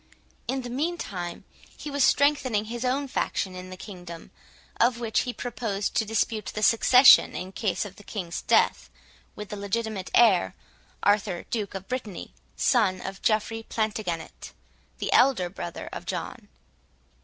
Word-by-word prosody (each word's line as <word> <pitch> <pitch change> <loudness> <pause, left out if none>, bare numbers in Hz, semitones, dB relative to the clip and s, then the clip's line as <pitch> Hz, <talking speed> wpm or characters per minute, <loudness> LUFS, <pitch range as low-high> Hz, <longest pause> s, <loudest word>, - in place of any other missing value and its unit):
In 265 0 -2
the 245 - -6
meantime, 245 - -3 0.3
he 295 - -7
was 285 -1 +1
strengthening 265 -8 +3
his 235 +2 -5
own 270 +3 0
faction 190 -7 -2
in 185 0 -8
the 185 - -9
kingdom, 175 -4 -10 0.5
of 235 0 +3
which 225 -3 0
he 250 - -1
proposed 225 -5 -3
to 220 - +1
dispute 220 -1 -1
the 215 - -4
succession, 250 +4 +7
in 185 +1 -5
case 195 -1 -1
of 195 -2 -10
the 205 - -13
King's 180 -5 -5
death, - - +2 0.5
with 210 -1 -8
the - - -5
legitimate 200 -1 -3
heir, 210 -7 +4 0.5
Arthur 205 -3 +1
Duke 210 -4 -3
of 195 0 -7
Brittany, 250 -7 -5 0.2
son 210 -8 +2
of 195 +1 -7
Geoffrey 225 +1 0
Plantagenet, 205 - -4 0.4
the - - -2
elder 190 -10 +4
brother 175 -3 -6
of - - -7
John. - - -5
215 Hz, 150 wpm, -26 LUFS, 190-240 Hz, 0.5 s, succession